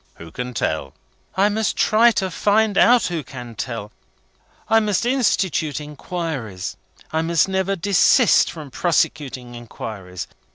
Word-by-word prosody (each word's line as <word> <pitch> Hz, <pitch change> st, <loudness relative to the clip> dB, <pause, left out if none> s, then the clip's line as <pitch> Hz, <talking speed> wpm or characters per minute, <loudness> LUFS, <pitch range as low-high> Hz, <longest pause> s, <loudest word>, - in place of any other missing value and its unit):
"Who 80 Hz, 0 st, -12 dB
can 125 Hz, +4 st, -6 dB
tell!" 75 Hz, -9 st, -2 dB, 0.4 s
"I 195 Hz, +2 st, +4 dB
must 215 Hz, 0 st, -1 dB
try 225 Hz, +2 st, +5 dB
to 190 Hz, -3 st, -1 dB
find 210 Hz, +3 st, +2 dB
out 245 Hz, +3 st, +5 dB
who 170 Hz, -4 st, -2 dB
can 125 Hz, -3 st, -9 dB
tell. 115 Hz, -2 st, -5 dB, 0.8 s
I 225 Hz, +1 st, +5 dB
must 210 Hz, 0 st, 0 dB
institute 195 Hz, -, +1 dB
inquiries. 150 Hz, -, -5 dB, 0.4 s
I 160 Hz, -, +1 dB
must 165 Hz, +1 st, +2 dB
never 190 Hz, 0 st, 0 dB
desist 195 Hz, +1 st, +4 dB
from 150 Hz, -5 st, -9 dB
prosecuting 135 Hz, -7 st, -1 dB
inquiries. 105 Hz, -6 st, -7 dB
160 Hz, 130 wpm, -21 LUFS, 120-200 Hz, 0.8 s, try